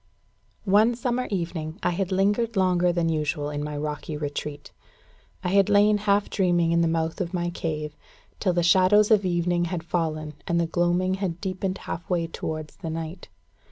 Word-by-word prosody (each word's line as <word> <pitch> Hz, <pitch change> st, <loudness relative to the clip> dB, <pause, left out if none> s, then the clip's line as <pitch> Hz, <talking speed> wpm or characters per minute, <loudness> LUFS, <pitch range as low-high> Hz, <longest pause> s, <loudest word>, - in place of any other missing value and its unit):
One 215 Hz, +4 st, +4 dB
summer 245 Hz, +1 st, -1 dB
evening, 170 Hz, -4 st, -3 dB
I -, -, +2 dB
had 190 Hz, +2 st, -2 dB
lingered 205 Hz, +4 st, +1 dB
longer 180 Hz, -2 st, +3 dB
than 170 Hz, -1 st, 0 dB
usual 150 Hz, -2 st, -1 dB
in 145 Hz, 0 st, -3 dB
my 150 Hz, 0 st, -4 dB
rocky 150 Hz, +1 st, -4 dB
retreat: 145 Hz, 0 st, -5 dB, 0.7 s
I 180 Hz, -, 0 dB
had 195 Hz, +1 st, +4 dB
lain 205 Hz, +1 st, +5 dB
half 205 Hz, 0 st, +2 dB
dreaming 175 Hz, -4 st, +2 dB
in 170 Hz, 0 st, +3 dB
the 165 Hz, -, +3 dB
mouth 165 Hz, +2 st, -1 dB
of 180 Hz, 0 st, -3 dB
my 175 Hz, 0 st, -1 dB
cave, 150 Hz, -3 st, -4 dB, 0.4 s
till 185 Hz, -4 st, +1 dB
the 175 Hz, 0 st, +1 dB
shadows 190 Hz, +4 st, +5 dB
of 205 Hz, -3 st, +4 dB
evening 175 Hz, 0 st, +1 dB
had 170 Hz, -1 st, -3 dB
fallen, 155 Hz, -3 st, -2 dB
and 170 Hz, 0 st, +1 dB
the 170 Hz, -, +2 dB
gloaming 175 Hz, +2 st, +1 dB
had 175 Hz, -3 st, -2 dB
deepened 190 Hz, -1 st, -3 dB
half 170 Hz, -, -7 dB
way 175 Hz, -2 st, +1 dB
towards 155 Hz, -2 st, -6 dB
the 165 Hz, -, -5 dB
night. 165 Hz, +2 st, -6 dB
175 Hz, 180 wpm, -25 LUFS, 160-195 Hz, 0.7 s, lain